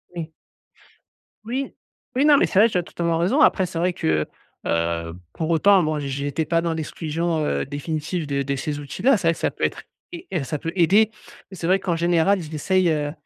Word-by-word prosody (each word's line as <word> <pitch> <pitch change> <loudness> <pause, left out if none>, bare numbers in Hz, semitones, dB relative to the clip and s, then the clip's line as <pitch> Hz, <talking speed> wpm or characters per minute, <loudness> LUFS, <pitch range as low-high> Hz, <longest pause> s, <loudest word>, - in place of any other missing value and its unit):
Oui. 160 -2 -5 1.1
Oui. 260 +4 -3 0.4
Oui, 270 +3 +3
non, 295 -1 +7
mais - - +3
c'est 190 - +2
vrai 220 - +7
je 210 -6 0
totalement 170 -1 -2
raison 190 - +2
après 195 -10 +4
c'est 170 - -7
vrai 180 +1 +1
que, 80 - 0 0.4
heu, 85 0 -1 0.2
pour 160 -1 -3
autant, 190 +4 +5
moi 155 -1 -1
j'étais 140 +2 -2
pas 165 +1 +1
dans 170 -1 -1
l'exclusion, 160 0 -2
heu, 70 - -1
définitive 155 +4 -3
de 140 -1 -1
de 140 0 -2
ces 145 +2 -3
outils-là. 185 - +1
C'est 175 - -1
vrai 165 - +4
que - - -12
ça - - 0
peut - - -7
être, - - -1 0.3
ai 350 +1 -9
heu, 170 -6 0
ça 150 +3 -3
peut 165 +3 -4
aider, 200 +5 +4 0.4
c'est 175 -3 -5
vrai 190 +2 +3
qu'en 180 -3 -1
général, 175 +3 +2
j'essaye, 170 +4 0
heu, 150 -2 0
165 Hz, 205 wpm, -23 LUFS, 150-185 Hz, 1.1 s, non